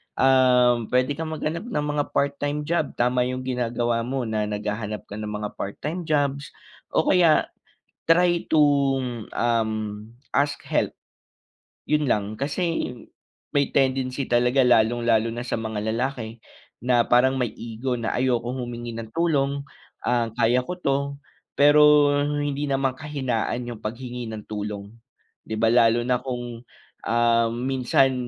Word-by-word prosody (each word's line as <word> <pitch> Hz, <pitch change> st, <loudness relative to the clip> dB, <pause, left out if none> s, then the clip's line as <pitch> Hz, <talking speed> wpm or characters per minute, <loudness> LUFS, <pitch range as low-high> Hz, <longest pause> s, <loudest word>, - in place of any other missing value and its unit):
Um, 125 Hz, -3 st, +4 dB
puwede 125 Hz, +2 st, +1 dB
kang 160 Hz, +3 st, -3 dB
maghanap 165 Hz, +8 st, -3 dB
ng 150 Hz, -11 st, -2 dB
mga 145 Hz, 0 st, 0 dB
part-time 145 Hz, +1 st, 0 dB
job, 155 Hz, -1 st, -1 dB
tama 125 Hz, +1 st, +1 dB
’yong 130 Hz, 0 st, -4 dB
ginagawa 120 Hz, -2 st, -1 dB
mo 130 Hz, +2 st, -2 dB
na 110 Hz, -2 st, -1 dB
naghahanap 105 Hz, 0 st, -4 dB
ka 105 Hz, -, -5 dB
ng 105 Hz, -, -4 dB
mga 105 Hz, 0 st, -4 dB
part-time 155 Hz, -, -4 dB
jobs, 145 Hz, -2 st, -1 dB, 0.4 s
o -, -, +4 dB
kaya, 175 Hz, -4 st, +4 dB, 0.6 s
try 175 Hz, +1 st, +4 dB
to, 155 Hz, -1 st, +4 dB, 0.7 s
um, 115 Hz, -2 st, +1 dB, 0.6 s
ask 145 Hz, 0 st, 0 dB
help. -, -, 0 dB, 0.9 s
’Yon 150 Hz, 0 st, +2 dB
lang. 105 Hz, -4 st, +1 dB
Kasi 155 Hz, 0 st, -1 dB, 0.6 s
may 140 Hz, -1 st, +2 dB
tendency 130 Hz, 0 st, 0 dB
talaga 125 Hz, +2 st, +3 dB
lalong 120 Hz, -1 st, +3 dB
lalo 115 Hz, 0 st, +3 dB
na 120 Hz, -, -4 dB
sa 120 Hz, -, -2 dB
mga 110 Hz, -2 st, -3 dB
lalaki 120 Hz, -2 st, -3 dB, 0.5 s
na 125 Hz, -1 st, +4 dB
parang 125 Hz, +2 st, +4 dB
may 120 Hz, -3 st, 0 dB
ego 120 Hz, +2 st, -3 dB
na 115 Hz, -1 st, -2 dB
ayokong 125 Hz, 0 st, 0 dB
humingi 120 Hz, -1 st, -6 dB
ng 115 Hz, -1 st, -7 dB
tulong, 140 Hz, -4 st, +1 dB, 0.4 s
ah, 120 Hz, -1 st, +1 dB
kaya 120 Hz, +2 st, +3 dB
ko 180 Hz, +8 st, -5 dB
'to, 140 Hz, -5 st, +1 dB, 0.6 s
pero 145 Hz, 0 st, +6 dB, 0.2 s
hindi 145 Hz, 0 st, -2 dB
naman 135 Hz, -1 st, +1 dB
kahinaan 130 Hz, -5 st, -2 dB
’yong 120 Hz, -2 st, -7 dB
paghingi 120 Hz, +1 st, -5 dB
ng 110 Hz, -1 st, -7 dB
tulong. 105 Hz, -1 st, -5 dB, 0.5 s
’Di 110 Hz, -, -5 dB
ba, 115 Hz, -, +3 dB
lalo 120 Hz, 0 st, +4 dB
na 125 Hz, -1 st, +1 dB
kung, 120 Hz, -2 st, -5 dB, 0.4 s
um, 115 Hz, 0 st, +2 dB
minsan 135 Hz, 0 st, +2 dB
125 Hz, 140 wpm, -24 LUFS, 115-140 Hz, 0.9 s, pero